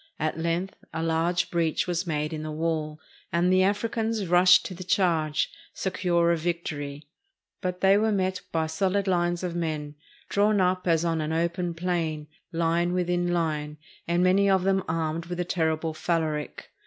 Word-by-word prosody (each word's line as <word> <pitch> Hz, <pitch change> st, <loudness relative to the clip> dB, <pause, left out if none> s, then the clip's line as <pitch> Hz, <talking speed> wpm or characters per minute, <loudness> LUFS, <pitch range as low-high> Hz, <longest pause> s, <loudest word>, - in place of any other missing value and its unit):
At 155 Hz, +1 st, -2 dB
length 170 Hz, +3 st, -2 dB
a 160 Hz, -, -3 dB
large 165 Hz, +2 st, 0 dB
breach 165 Hz, -2 st, +1 dB
was 175 Hz, 0 st, -2 dB
made 150 Hz, 0 st, -1 dB
in 155 Hz, -, -4 dB
the 155 Hz, -, -5 dB
wall, 155 Hz, -1 st, -2 dB, 0.3 s
and 175 Hz, +2 st, +2 dB
the 185 Hz, -, +5 dB
Africans 220 Hz, +2 st, 0 dB
rushed 180 Hz, +1 st, +6 dB
to -, -, -5 dB
the 185 Hz, +1 st, -8 dB
charge, 165 Hz, -5 st, +1 dB, 0.2 s
se 190 Hz, -, -2 dB
cure 170 Hz, -3 st, +2 dB
of 170 Hz, -, +1 dB
victory. 150 Hz, -4 st, -4 dB, 0.5 s
But 180 Hz, 0 st, -3 dB
they 195 Hz, +1 st, +5 dB
were 220 Hz, +1 st, +2 dB
met 190 Hz, -2 st, 0 dB
by 160 Hz, -1 st, +1 dB
solid 195 Hz, +4 st, 0 dB
lines 175 Hz, -1 st, +1 dB
of 175 Hz, -2 st, -3 dB
men 155 Hz, -3 st, -3 dB, 0.3 s
drawn 205 Hz, +1 st, +2 dB
up 185 Hz, 0 st, +1 dB
as 165 Hz, 0 st, +3 dB
on 165 Hz, -1 st, 0 dB
an 155 Hz, +1 st, -2 dB
open 170 Hz, +1 st, -1 dB
plain, 165 Hz, -3 st, -2 dB, 0.3 s
line 170 Hz, +1 st, +1 dB
within 175 Hz, -1 st, 0 dB
line, 155 Hz, -3 st, -1 dB, 0.3 s
and 170 Hz, +1 st, +2 dB
many 195 Hz, +2 st, +4 dB
of 190 Hz, -1 st, +3 dB
them 190 Hz, 0 st, +2 dB
armed 160 Hz, +1 st, -2 dB
with 175 Hz, 0 st, -4 dB
the 175 Hz, -, -1 dB
terrible 160 Hz, -2 st, 0 dB
/a/anc. 155 Hz, -2 st, -2 dB
170 Hz, 175 wpm, -26 LUFS, 160-185 Hz, 0.5 s, rushed